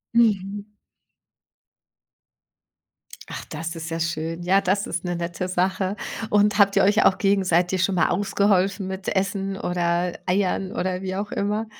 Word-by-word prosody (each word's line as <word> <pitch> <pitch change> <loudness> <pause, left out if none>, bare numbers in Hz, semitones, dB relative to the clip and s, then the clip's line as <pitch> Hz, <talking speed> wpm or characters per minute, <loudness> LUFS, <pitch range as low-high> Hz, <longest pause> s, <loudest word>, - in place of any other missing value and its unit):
Mhm. 205 -2 +1 2.5
Ach, - - -6
das 165 +2 -5
ist 165 0 -6
ja 165 0 -3
schön. 165 +1 -3
Ja, 195 +2 +3
das 195 +2 0
ist 170 +1 -4
'ne 175 -1 -2
nette 170 +1 -3
Sache. 185 +2 0 0.3
Und 210 0 +3
habt 200 -1 +5
ihr 200 - +4
euch 210 +3 +4
auch 190 - +4
gegenseitig 185 -2 +2
schon 195 - +1
mal 165 - +3
ausgeholfen 195 0 +1
mit 190 0 -6
Essen 195 0 -1
oder 175 0 0
Eiern 190 0 0
oder 185 +1 -2
wie 190 0 -4
auch 205 +1 -4
immer? 210 +2 -1
190 Hz, 145 wpm, -23 LUFS, 175-200 Hz, 2.5 s, habt